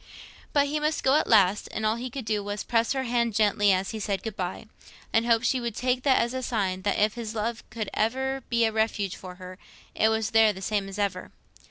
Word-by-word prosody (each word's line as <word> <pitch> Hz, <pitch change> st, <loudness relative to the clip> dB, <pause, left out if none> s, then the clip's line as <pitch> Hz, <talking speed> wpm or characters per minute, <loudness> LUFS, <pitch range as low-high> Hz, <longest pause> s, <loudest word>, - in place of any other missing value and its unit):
But 285 Hz, -1 st, +3 dB
he 300 Hz, +2 st, -1 dB
must 305 Hz, +1 st, -1 dB
go 265 Hz, -, +4 dB
at -, -, 0 dB
last, 205 Hz, -2 st, +4 dB
and 220 Hz, -, -3 dB
all 215 Hz, +1 st, +2 dB
he 250 Hz, +2 st, -5 dB
could 260 Hz, -1 st, -6 dB
do 210 Hz, -1 st, -1 dB
was 205 Hz, 0 st, -4 dB
to -, -, -8 dB
press 230 Hz, 0 st, +1 dB
her 265 Hz, -1 st, -1 dB
hand 235 Hz, -3 st, 0 dB
gently 205 Hz, -1 st, +3 dB
as 190 Hz, +1 st, 0 dB
he 220 Hz, -, -5 dB
said 200 Hz, -2 st, -2 dB
"Good 225 Hz, -3 st, -5 dB
bye," 180 Hz, +2 st, -4 dB, 0.5 s
and 225 Hz, +1 st, +2 dB
hope 230 Hz, -1 st, +3 dB
she 255 Hz, +1 st, +1 dB
would 235 Hz, -2 st, -4 dB
take 250 Hz, +1 st, 0 dB
that 265 Hz, 0 st, +3 dB
as 235 Hz, +1 st, +1 dB
a 260 Hz, -, -3 dB
sign 195 Hz, -7 st, -1 dB
that 200 Hz, +1 st, 0 dB
if 210 Hz, 0 st, +2 dB
his 230 Hz, -2 st, -6 dB
love 225 Hz, +2 st, -2 dB
could 220 Hz, -3 st, -4 dB
ever 265 Hz, +4 st, -1 dB
be 235 Hz, -1 st, +3 dB
a 220 Hz, -, +1 dB
refuge 215 Hz, -3 st, -1 dB
for 185 Hz, -1 st, -10 dB
her, 185 Hz, 0 st, -10 dB, 0.3 s
it 220 Hz, -, +3 dB
was 220 Hz, +1 st, -1 dB
there 225 Hz, -1 st, +5 dB
the 190 Hz, -, -9 dB
same 200 Hz, -2 st, -1 dB
as 195 Hz, -, -8 dB
ever. 200 Hz, -1 st, -2 dB
220 Hz, 250 wpm, -26 LUFS, 205-240 Hz, 0.5 s, there